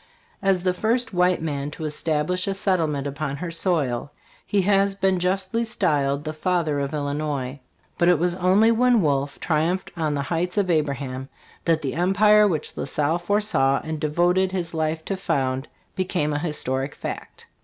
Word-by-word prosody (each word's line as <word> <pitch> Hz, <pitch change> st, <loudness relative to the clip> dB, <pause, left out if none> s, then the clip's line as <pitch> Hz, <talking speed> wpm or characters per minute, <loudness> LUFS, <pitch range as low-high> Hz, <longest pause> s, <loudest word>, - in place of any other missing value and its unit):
As 195 Hz, -2 st, +2 dB
the 185 Hz, -1 st, +2 dB
first 230 Hz, +5 st, 0 dB
white 180 Hz, -1 st, +2 dB
man 145 Hz, -2 st, -2 dB
to 155 Hz, +1 st, -7 dB
establish 155 Hz, +4 st, 0 dB
a 195 Hz, -, -1 dB
settlement 160 Hz, -8 st, 0 dB
upon 140 Hz, 0 st, -3 dB
her 170 Hz, +3 st, -5 dB
soil, 145 Hz, -7 st, -1 dB, 0.4 s
he 200 Hz, -2 st, +2 dB
has 195 Hz, 0 st, +3 dB
been 190 Hz, -1 st, +1 dB
justly 190 Hz, +5 st, 0 dB
styled 145 Hz, -11 st, 0 dB
"the 155 Hz, 0 st, -4 dB
Father 155 Hz, -2 st, 0 dB
of 140 Hz, 0 st, -2 dB
Illinois"; 145 Hz, -2 st, -3 dB, 0.4 s
but 175 Hz, -, +4 dB
it 180 Hz, -, +5 dB
was 175 Hz, +3 st, +1 dB
only 190 Hz, +5 st, +4 dB
when 240 Hz, 0 st, +4 dB
Wolfe 140 Hz, -1 st, 0 dB
triumphed 165 Hz, +3 st, 0 dB
on 155 Hz, -3 st, -1 dB
the 140 Hz, -, -1 dB
Heights 175 Hz, +4 st, -1 dB
of 190 Hz, -3 st, +2 dB
Abraham 140 Hz, -4 st, -2 dB, 0.4 s
that 165 Hz, -2 st, +2 dB
the 135 Hz, -2 st, -2 dB
empire 210 Hz, +5 st, +4 dB
which 160 Hz, -6 st, -2 dB
La -, -, -3 dB
Salle 155 Hz, +3 st, 0 dB
foresaw 175 Hz, -8 st, +2 dB
and 160 Hz, -1 st, -4 dB
devoted 175 Hz, +5 st, +2 dB
his 180 Hz, -3 st, -3 dB
life 160 Hz, 0 st, -2 dB
to 195 Hz, -, -2 dB
found, 130 Hz, -6 st, -1 dB, 0.3 s
became 175 Hz, -5 st, -1 dB
a 145 Hz, -, 0 dB
historic 140 Hz, -4 st, -2 dB
fact. -, -, -7 dB
165 Hz, 170 wpm, -23 LUFS, 145-185 Hz, 0.4 s, it